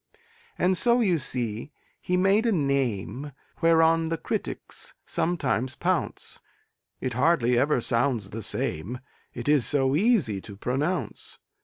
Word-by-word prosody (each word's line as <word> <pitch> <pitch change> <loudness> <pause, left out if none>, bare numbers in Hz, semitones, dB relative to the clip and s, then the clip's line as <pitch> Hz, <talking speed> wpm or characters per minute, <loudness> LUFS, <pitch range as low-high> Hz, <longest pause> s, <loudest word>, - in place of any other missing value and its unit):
And 185 0 +2
so, 240 0 +4
you 185 -8 +2
see, 120 -1 -4 0.3
he 180 - 0
made 195 +5 +3
a - - +3
name 140 - -1 0.3
Whereon 165 0 +4
the 165 - -1
critics - - -4
sometimes 130 -7 -1
pounce; - - -2 0.6
It 130 - -3
hardly 125 -2 +3
ever 135 +2 +3
sounds 115 -4 0
the 115 - -5
same, 95 +4 -3 0.4
It 120 +1 -6
is 145 -3 +4
so 135 -1 +2
easy 170 - +2
to 100 0 -10
pronounce. 140 - -2
140 Hz, 130 wpm, -26 LUFS, 120-165 Hz, 0.6 s, so